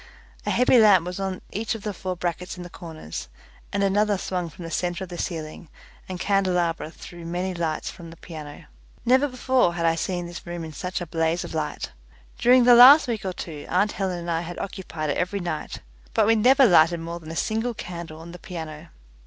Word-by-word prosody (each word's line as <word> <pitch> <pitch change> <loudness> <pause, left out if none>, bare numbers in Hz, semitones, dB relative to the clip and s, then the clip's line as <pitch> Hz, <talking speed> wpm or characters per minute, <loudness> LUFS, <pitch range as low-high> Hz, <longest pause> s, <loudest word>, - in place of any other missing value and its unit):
A - - +2
heavy 250 0 +5
lamp 200 -6 +6
was 180 +1 -5
on 190 -1 -3
each 225 +2 -2
of 215 - -8
the 210 - -3
four 185 0 -4
brackets 180 +1 -4
in 180 - -7
the 175 - -10
corners, 155 - -8 0.4
and 200 0 0
another 205 +1 +2
swung 180 -2 -3
from 165 +2 -10
the 165 - -7
centre 180 +2 -2
of 185 - -9
the 175 - -6
ceiling, 160 -1 -5 0.4
and 185 -1 -5
candelabra 180 -5 +1
threw 170 +1 -11
many 180 +3 -2
lights 165 -3 -2
from 170 -1 -11
the 165 - -12
piano. 155 -4 -9 0.4
Never 260 +4 +4
before 255 -7 +1
had 170 -1 -1
I 165 - +4
seen 175 +1 -2
this 175 0 -9
room 175 -1 -5
in 160 -1 -7
such 180 +4 -4
a - - -3
blaze 165 +1 0
of - - -8
light. 155 - -3 0.5
During 250 +1 +6
the 245 0 +7
last 260 +6 +9
week 230 -3 -2
or 190 -1 -3
two 155 -4 -7
aunt 200 +3 +2
Helen 190 -3 -2
and 170 0 -4
I 165 0 0
had 175 +1 -7
occupied 165 -6 -4
it - - -2
every 180 +3 -1
night, 170 -4 -4 0.3
but - - +4
we 225 +2 +4
never 260 +5 +6
lighted 170 -4 +5
more 170 +1 -5
than 160 -2 -11
a 165 - -6
single 225 +6 -1
candle 170 -5 -7
on 170 +1 -10
the 175 - -10
piano. 160 -2 -8
175 Hz, 220 wpm, -24 LUFS, 165-200 Hz, 0.5 s, last